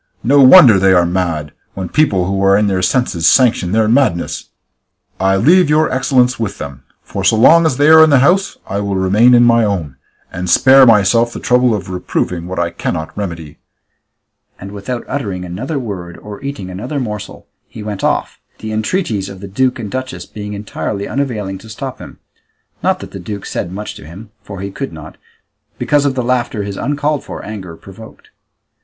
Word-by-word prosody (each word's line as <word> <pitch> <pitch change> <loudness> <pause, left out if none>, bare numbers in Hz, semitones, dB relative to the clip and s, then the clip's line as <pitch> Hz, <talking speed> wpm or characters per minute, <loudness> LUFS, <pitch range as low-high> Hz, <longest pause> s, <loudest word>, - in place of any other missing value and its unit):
No 140 +4 +4
wonder 130 - +8
they 95 0 +4
are 90 -1 +4
mad, 85 -4 -2 0.2
when 95 -2 -4
people 100 - +1
who 95 +1 -1
are 95 0 +4
in 105 - +2
their 95 -2 0
senses 90 -5 0
sanction 115 -8 +3
their 110 +1 +2
madness! 115 -8 0 0.7
I 95 +1 +2
leave 175 - +4
your 155 +1 +2
excellence 125 -1 +1
with 105 -3 -3
them, 70 -2 -8 0.2
for 100 - -6
so 95 +4 +3
long 160 +9 +5
as 130 - -1
they 145 +1 +3
are 160 0 +8
in 160 - +4
the 140 - +5
house, 180 +9 +2
I 100 - -3
will 100 -1 -2
remain 105 +7 +4
in 120 - +5
my 115 -1 +4
own, 85 -11 -3 0.4
and 90 +1 -4
spare 130 +8 +6
myself 115 +2 +3
the - - -7
trouble 125 -2 +2
of 95 -2 -6
reproving 90 -1 -3
what 95 - -6
I 85 0 -1
cannot 80 -1 -4
remedy;" 85 -7 -6 1.0
and 95 +1 -9
without 105 +4 -6
uttering 100 -10 -4
another 120 - -5
word, 95 -9 -6
or 105 -1 -10
eating 135 -10 -6
another 125 +11 -5
morsel, 105 -5 -6 0.2
he 110 - -10
went 105 -2 -6
off, - - -1 0.2
the 110 - -7
entreaties 110 - -2
of 95 - -10
the 100 - -8
duke 125 +6 0
and 105 -4 -7
duchess 130 0 -5
being 105 -1 -8
entirely 100 0 -5
unavailing 105 -9 -3
to 110 - -14
stop 130 +4 -7
him; - - -11 0.6
not - - 0
that - - -9
the 95 - -8
duke 100 +2 -7
said 90 - -4
much 105 +3 -6
to - - -13
him, 100 +7 -12
for 100 -2 -9
he 100 0 -5
could 135 0 -6
not, 80 0 -11 0.6
because 145 -1 +1
of 135 -2 0
the 125 - -1
laughter 120 -3 -1
his 100 -1 -6
uncalled 145 +4 -2
for - - -8
anger 95 -6 -8
provoked. 105 +3 -14
105 Hz, 195 wpm, -15 LUFS, 95-130 Hz, 1.0 s, wonder